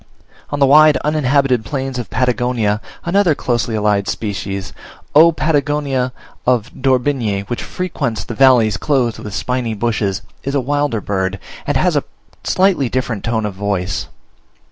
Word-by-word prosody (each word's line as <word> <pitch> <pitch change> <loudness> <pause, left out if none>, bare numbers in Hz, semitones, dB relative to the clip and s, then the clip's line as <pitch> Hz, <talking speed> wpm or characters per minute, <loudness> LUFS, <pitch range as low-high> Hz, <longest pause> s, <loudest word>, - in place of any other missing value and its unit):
On 145 - -2
the 140 - +4
wide 150 +1 +6
uninhabited 140 -5 +2
plains 135 0 -3
of 120 - -6
Patagonia 125 -4 0 0.2
another 175 -2 +3
closely 120 -4 -1
allied 105 -2 +1
species, 100 -2 -4 0.4
O. 160 +3 +7
Patagonica 145 -4 0 0.4
of 120 -2 +2
d'Orbigny, 125 -6 +1
which 110 +4 -5
frequents 150 -10 -3
the - - -6
valleys 120 -5 +4
clothed 125 -2 0
with 105 -2 -7
spiny 125 +2 -2
bushes, 105 -3 -1 0.2
is 140 +1 -3
a - - +3
wilder 145 -3 0
bird, 95 -1 -2 0.3
and - - +2
has - - +2
a - - +1 0.4
slightly 185 -9 +2
different 125 -5 -2
tone 115 -2 -1
of 105 - -3
voice. 95 -1 -2
125 Hz, 145 wpm, -17 LUFS, 105-140 Hz, 0.4 s, O